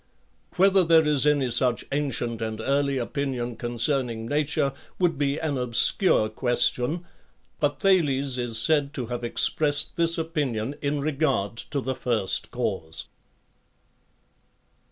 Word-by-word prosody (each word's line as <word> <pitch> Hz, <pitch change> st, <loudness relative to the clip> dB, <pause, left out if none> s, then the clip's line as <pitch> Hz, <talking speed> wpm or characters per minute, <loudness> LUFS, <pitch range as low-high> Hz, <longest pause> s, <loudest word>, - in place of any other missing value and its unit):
Whether 190 Hz, 0 st, +4 dB
there 165 Hz, -1 st, +4 dB
is 150 Hz, -1 st, +3 dB
any 140 Hz, -4 st, +1 dB
such 120 Hz, 0 st, +2 dB
ancient 135 Hz, -5 st, -2 dB
and 110 Hz, -1 st, -4 dB
early 140 Hz, 0 st, 0 dB
opinion 125 Hz, -1 st, -3 dB
concerning 120 Hz, 0 st, -2 dB
nature 145 Hz, 0 st, 0 dB, 0.2 s
would 170 Hz, -5 st, 0 dB
be 140 Hz, 0 st, 0 dB
an 150 Hz, -5 st, -2 dB
obscure 125 Hz, -, +4 dB
ques 120 Hz, +2 st, +2 dB
tion; 155 Hz, +8 st, -4 dB, 0.5 s
but 145 Hz, -1 st, -1 dB
Thales 140 Hz, -9 st, +1 dB
is 120 Hz, -2 st, -2 dB
said 145 Hz, +3 st, +1 dB
to 125 Hz, -, -4 dB
have 120 Hz, -, -5 dB
expressed 145 Hz, +5 st, +1 dB
this 170 Hz, 0 st, +3 dB
opinion 145 Hz, -7 st, -2 dB
in 145 Hz, 0 st, -1 dB
regard 140 Hz, -8 st, -1 dB
to 140 Hz, -3 st, -2 dB
the 130 Hz, 0 st, -3 dB
first 115 Hz, -6 st, -1 dB
cause. 80 Hz, 0 st, -5 dB
140 Hz, 130 wpm, -25 LUFS, 120-150 Hz, 0.5 s, Whether